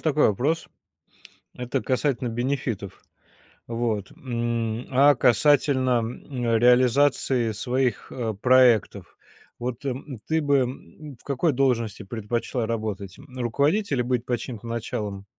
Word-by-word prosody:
такой 150 -4 +3
вопрос. 145 +11 0 0.9
Это 125 -1 -3
касательно 130 -1 0
бенефитов. 120 -4 -3 0.7
Вот, 115 -4 -2
м, 120 -2 -3
а, 140 +2 +6
касательно, 130 0 +3
м, 120 0 -2
реализации 125 0 +3
своих, 125 +1 -1
э, 115 -4 -3
проектов? 115 -4 +3 0.4
Вот, 125 +2 -5
м, 135 0 -4
ты 160 0 +1
бы, 145 -1 +3
м, 135 +2 -6
в - - -23
какой 140 +3 0
должности 115 -5 0
предпочла 115 +3 -3
работать? 105 -4 -4
М, 140 - -14
руководителем 140 - +1
или - - -7
быть 125 -1 0
под 120 -2 -1
чьим-то 120 -3 -7
началом 105 -4 -4
125 Hz, 120 wpm, -25 LUFS, 115-135 Hz, 0.9 s, а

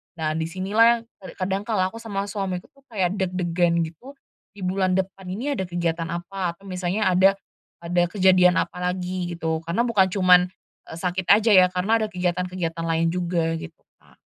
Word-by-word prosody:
nah 155 -2 -2
di 160 0 -2
sinilah 190 +6 +2
yang - - -10 0.2
kad 190 - -10
kadang 195 +1 -1
kalau 190 -4 0
aku 230 - -9
sama 205 -3 -3
suamiku 190 -3 -4
tuh 275 - -26
kayak 190 -5 0
deg-degan 175 -2 0
gitu, 165 - -10 0.4
di 200 - -9
bulan 185 0 +1
depan 190 0 -3
ini 225 +11 -3
ada 190 - -3
kegiatan 170 -1 -2
apa 175 +1 -4
atau 195 - -25
misalnya 185 +1 -1
ada 190 +2 +5 0.5
ada 175 +1 +1
kejadian 185 -1 +4
apa - - -6
lagi 180 0 -3
gitu 160 -1 -1
karena 170 +8 0
bukan 215 -6 +3
cuman, 180 -2 +5 0.4
eee, 160 - -8
sakit 180 0 -2
aja 220 +2 +3
ya 185 -2 +8
karena 200 +5 +1
ada 215 - 0
kegiatan-kegiatan 180 -2 -2
lain 165 0 +1
juga 170 -2 -1
gitu 165 -1 -11 0.2
Kak. - - -25
180 Hz, 180 wpm, -23 LUFS, 175-195 Hz, 0.5 s, ya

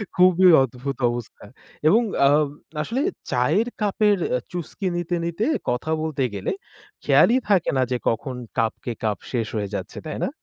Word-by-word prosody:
খুবই 185 0 +6
অদ্ভুত 130 +2 -4
অবস্থা 120 -3 -6 0.4
এবং 215 +9 +5 0.3
আ - - +5 0.5
আসলে 230 - -2 0.3
চায়ের 150 - +2
কাপের 210 0 +2 0.2
আ - - -3
চুসকি 180 +3 -4
নিতে 175 0 -2
নিতে 170 +6 -1 0.2
কথা 125 +6 -1
বলতে 155 -4 -1
গেলে - - -2 0.5
খেয়ালই 245 - +5
থাকে 190 -5 +3
না - - +3
যে 125 - +1
কখন 125 +3 -3 0.2
কাপকে 115 +1 -1
কাপ 105 -2 0
শেষ 120 -4 -1
হয়ে 100 -2 -2
যাচ্ছে। 95 +1 -6
তাই 155 - -5
না? - - -2
155 Hz, 155 wpm, -23 LUFS, 120-185 Hz, 0.5 s, খুবই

